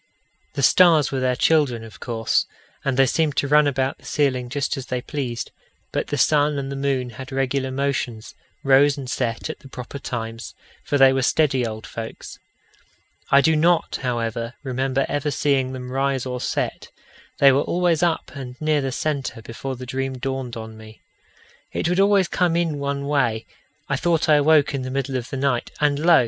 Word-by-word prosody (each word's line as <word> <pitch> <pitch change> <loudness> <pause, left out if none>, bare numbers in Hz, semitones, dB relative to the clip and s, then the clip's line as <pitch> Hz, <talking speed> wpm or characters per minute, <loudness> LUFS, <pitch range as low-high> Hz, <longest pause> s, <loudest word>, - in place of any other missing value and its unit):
The 140 - -1
stars 160 0 +5
were 135 - -1
their 130 -1 +1
children, 135 -5 +2
of 110 -5 -12
course, 115 -2 0 0.4
and 135 -3 -1
they 135 - +6
seemed 150 +2 0
to 140 - +1
run 150 +1 +5
about 135 -1 -1
the - - -20
ceiling 130 -4 0
just 145 +3 -1
as 135 -2 -7
they 125 - -2
pleased; 125 -3 -4 0.4
but - - -2
the 145 - -2
sun 150 +1 +3
and 135 0 -4
the - - -4
moon 135 -3 -1
had 130 +4 -9
regular 135 0 -1
motions 130 -4 -2 0.3
rose 140 +2 +5
and 135 -2 -6
set 120 -3 -2
at 155 - -6
the 140 - -14
proper 125 +2 -8
times, 115 -3 -6 0.3
for 145 - 0
they 135 -1 +6
were 135 - +1
steady 130 -3 +2
old 110 0 -7
folks. 115 -1 -8 0.9
I 140 - +6
do 160 +3 +3
not, 165 +2 +2
however, 115 -1 -2
remember 135 0 0
ever 145 +1 -1
seeing 140 -2 +1
them 125 -1 -7
rise 135 -1 0
or 125 -1 -4
set; - - -2 0.5
they 140 -1 +7
were 135 +2 +3
always 175 -1 +1
up 170 -2 0
and 130 -3 -8
near 155 -1 +1
the 135 -1 -2
centre 135 -4 -3
before 130 +4 -6
the 125 +1 -8
dream 130 +1 -3
dawned 130 -2 -4
on 110 -1 -8
me. 110 0 -14 0.7
It - - -1
would 180 +2 +1
always 195 -2 +4
come 175 -2 +1
in 165 -4 0
one 140 0 -2
way: 125 -6 0 0.4
I - - 0
thought 170 -2 +1
I 150 -1 +6
awoke 150 0 +4
in 135 - -2
the 130 - -4
middle 135 0 -2
of 125 -1 -3
the 135 - -4
night, 130 -3 0
and 145 -1 +2
lo! 170 -1 +7
135 Hz, 195 wpm, -22 LUFS, 125-145 Hz, 0.9 s, they